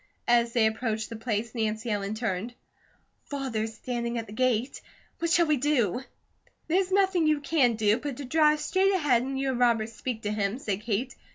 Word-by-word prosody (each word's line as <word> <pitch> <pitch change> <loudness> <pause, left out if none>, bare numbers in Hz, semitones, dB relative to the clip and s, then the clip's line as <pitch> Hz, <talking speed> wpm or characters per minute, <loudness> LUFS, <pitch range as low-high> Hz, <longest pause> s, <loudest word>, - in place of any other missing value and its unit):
As 235 -1 +3
they 230 -3 +4
approached 220 0 -1
the - - -4
place 225 0 -3
Nancy 220 0 -2
Ellen 205 0 -2
turned. 220 +1 -3 0.7
"Father's 225 -6 -3
standing 235 -1 -3
at 230 - -3
the 210 - -11
gate. 255 +1 0 0.4
What 335 - 0
shall 340 +1 +4
we 305 -2 +2
do?" 250 -6 +1 0.7
"There's 370 +3 +1
nothing 380 -4 +3
you 305 -1 +3
can 280 -5 +2
do, 215 +1 +2
but 285 0 -4
drive 305 +2 +4
straight 385 +1 +2
ahead 285 -9 +3
and 265 +1 -3
you 270 0 0
and 250 - -3
Robert 230 -3 +3
speak 230 0 -5
to 210 - -1
him," 210 +1 -1
said 205 -7 -3
Kate. 235 +3 -2
240 Hz, 185 wpm, -27 LUFS, 220-285 Hz, 0.7 s, they